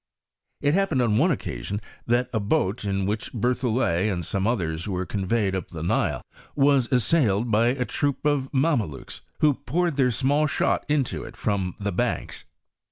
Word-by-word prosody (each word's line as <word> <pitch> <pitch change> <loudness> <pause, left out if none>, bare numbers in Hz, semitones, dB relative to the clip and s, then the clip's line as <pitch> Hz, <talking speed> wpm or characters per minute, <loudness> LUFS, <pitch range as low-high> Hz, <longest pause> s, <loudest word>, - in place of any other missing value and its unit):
It 145 +1 +2
happened 175 -9 +2
on 110 -2 +2
one 170 +7 +4
occasion 100 - -3 0.3
that 120 +1 +2
a. 110 - +1
boat, 105 -1 0
in 100 -1 0
which 105 +5 -2
Berthollet 115 -5 +1
and 85 -3 -3
some 100 +4 -1
others 85 -8 -1
were 95 -2 -2
con 95 -1 -3
veyed 105 -3 +1
up 95 -3 -3
the 80 -3 -7
Nile, 85 - 0 0.3
was 140 -3 +3
assailed 125 -5 +2
by 115 +4 +3
atroop 140 +3 -1
of 145 -3 +1
Mame 140 -1 +2
lukes, 70 - -9 0.2
who 150 -1 +5
poured 165 +4 -1
their 130 -2 +4
small 140 +5 +2
shot 140 - 0
into 145 -4 0
it - - -10
from 95 -4 -1
the 100 0 -2
banks. - - -2
120 Hz, 170 wpm, -25 LUFS, 100-140 Hz, 0.3 s, who